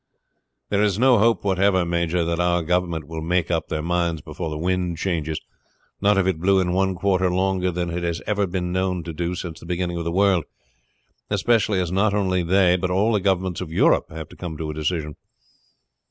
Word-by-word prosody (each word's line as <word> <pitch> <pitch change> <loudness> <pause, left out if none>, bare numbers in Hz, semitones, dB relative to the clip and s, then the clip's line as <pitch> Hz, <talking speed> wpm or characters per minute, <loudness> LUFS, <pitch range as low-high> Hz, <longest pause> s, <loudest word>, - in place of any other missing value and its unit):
"There 100 0 +1
is 105 -2 +2
no 125 -1 +5
hope 115 +2 +3
whatever, 95 -1 +2
major, 85 0 0
that 85 0 -1
our 90 -1 +2
government 85 -2 -1
will 80 0 -5
make 85 +1 0
up 85 -1 -1
their 75 -1 -3
minds 85 -1 0
before 80 +3 -6
the 75 - -4
wind 90 0 -1
changes, 80 -4 -2 0.6
not 100 0 +3
if 95 - +3
it 95 -4 0
blew 95 +3 +3
in 90 -1 0
one 95 0 +1
quarter 95 0 +1
longer 95 0 +1
than 90 -1 -2
it 85 +1 -3
has 85 -1 -1
ever 100 -1 0
been 90 -1 -3
known 90 -1 -1
to 85 0 -6
do 85 +3 -2
since 85 -2 -6
the - - -12
beginning 90 0 -2
of 85 - -3
the 85 - -2
world. 95 -3 +2 0.8
Especially, 105 0 +2
as 90 -2 -1
not 100 +2 +2
only 95 -3 +1
they, 90 +1 +3
but 90 0 -2
all 100 +5 +2
the 105 - +2
governments 95 -2 0
of 85 -3 -6
Europe - - +3
have 80 -1 -7
to - - -14
come 85 -4 -6
to 80 -1 -4
a - - -6
decision." 75 -1 -3
90 Hz, 210 wpm, -23 LUFS, 85-95 Hz, 0.8 s, no